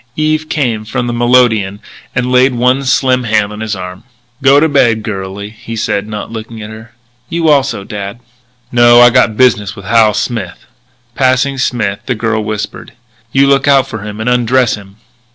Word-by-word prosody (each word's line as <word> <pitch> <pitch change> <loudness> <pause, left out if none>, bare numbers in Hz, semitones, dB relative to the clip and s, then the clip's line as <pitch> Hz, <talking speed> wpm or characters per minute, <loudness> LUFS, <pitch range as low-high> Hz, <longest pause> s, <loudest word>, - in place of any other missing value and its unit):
Eve 155 0 -1
came 120 -8 -1
from 120 +3 -3
the 120 - -3
melodeon 120 -5 +2 0.4
and 125 0 -1
laid 130 0 +3
one 125 +3 +1
slim 130 -1 +1
hand 105 -2 0
on 105 - -8
his 110 -1 -3
arm. 90 -1 -8 0.4
"Go 135 +1 +5
to 160 - +3
bed, 120 -7 +2
girlie," 100 -1 -6
he 115 +1 -9
said, 105 -1 -2
not 105 0 -6
looking 115 0 -8
at 105 0 -8
her. 110 +1 -13 0.3
"You 165 -2 0
also, 135 -8 +1
dad." 100 +2 -7 0.5
"No.... 120 0 +6
I 120 0 +7
got 120 -3 +2
business 110 -5 +2
with 100 -3 -11
Hal 110 -1 +3
Smith." 105 -8 -4 0.5
Passing 130 +1 +1
Smith, 110 -6 -1
the 125 - 0
girl 115 0 -1
whispered: 105 0 -5 0.4
"You 135 0 +3
look 140 0 +2
out 140 -2 +4
for 110 - -7
him 105 +1 -7
and 110 - -4
undress 125 0 +2
him." 100 -2 -9
115 Hz, 180 wpm, -13 LUFS, 105-130 Hz, 0.5 s, I